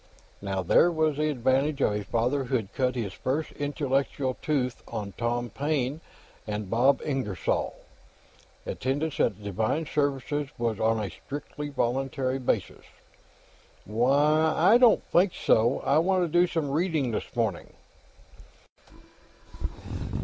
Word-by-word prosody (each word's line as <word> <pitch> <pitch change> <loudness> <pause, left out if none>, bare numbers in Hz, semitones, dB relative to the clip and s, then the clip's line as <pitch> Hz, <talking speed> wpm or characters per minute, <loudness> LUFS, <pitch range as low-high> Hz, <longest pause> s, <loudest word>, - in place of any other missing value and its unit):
Now 95 -2 -2
there 130 - +5
was 155 -3 +1
the 155 0 +1
advantage 135 +2 +1
of 110 - +2
a 105 0 -2
father 125 +6 0
who'd 120 -6 -2
cut 130 -1 0
his 105 -6 -3
first 145 +9 -2
intellectual 140 -2 -1
tooth 130 -5 -1
on 105 -3 -5
Tom 120 0 -2
Paine 145 +1 -1 0.5
and 105 -2 -4
Bob 130 +5 +3
Ingersoll; 130 - -1 0.9
attendance 145 +4 -2
at 105 -1 +1
divine 110 - -1
services 145 0 -1
was 115 -3 -1
on 110 0 +2
a 105 -2 -3
strictly 145 +1 -7
voluntary 135 0 -1
basis. 125 - -2 1.0
"Why, 145 +8 +3
I 200 +8 +6
don't 240 -4 +5
think 180 +1 +4
so; 115 +4 +2
I 140 +3 +3
want 185 +2 +2
to - - +1
do 180 - +5
some 160 -5 -2
reading, 155 -5 0
this 110 - -5
morning." 110 -7 -1
135 Hz, 130 wpm, -27 LUFS, 115-150 Hz, 1.0 s, I